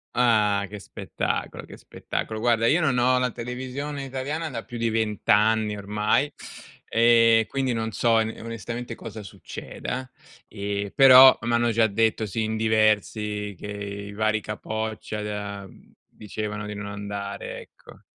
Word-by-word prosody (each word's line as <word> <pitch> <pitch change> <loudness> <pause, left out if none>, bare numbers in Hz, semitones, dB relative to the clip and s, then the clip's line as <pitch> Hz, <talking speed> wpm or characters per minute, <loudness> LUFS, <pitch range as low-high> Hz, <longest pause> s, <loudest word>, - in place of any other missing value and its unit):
Ah, 105 -4 +3
che 105 +1 -8
spettacolo, - - -4
che - - -12
spettacolo. 110 -1 -5
Guarda, 115 -1 +2
io 160 +9 +3
non 140 -5 +2
ho 125 +1 +3
la 125 -1 0
televisione 130 +5 -5
italiana 140 +5 -4
da 115 -4 -5
più 120 - -8
di 115 0 0
20 110 -2 -2
anni 105 0 +3
ormai, 105 +8 0 0.6
e 115 -1 +5
quindi 135 -2 -1
non 110 0 -2
so 115 +2 +2
in 110 0 0
onestamente 115 +1 -6
cosa 110 -1 -8
succeda. 125 +6 -7 0.4
E 100 0 -4
però 130 -1 +9
m'hanno 120 0 +1
già 115 0 +3
detto 110 +1 +1
sì, 110 +2 -2
in 110 0 -2
diversi, 105 -1 +1
che - - -7
i 100 0 -6
vari 110 +1 0
capoccia 110 0 -4
da 100 -1 -5
mhmm, - - -20 0.2
dicevano 105 0 -6
di 105 - -5
non 100 0 -6
andare, 100 0 -6
ecco. - - -17
110 Hz, 150 wpm, -25 LUFS, 105-120 Hz, 0.6 s, però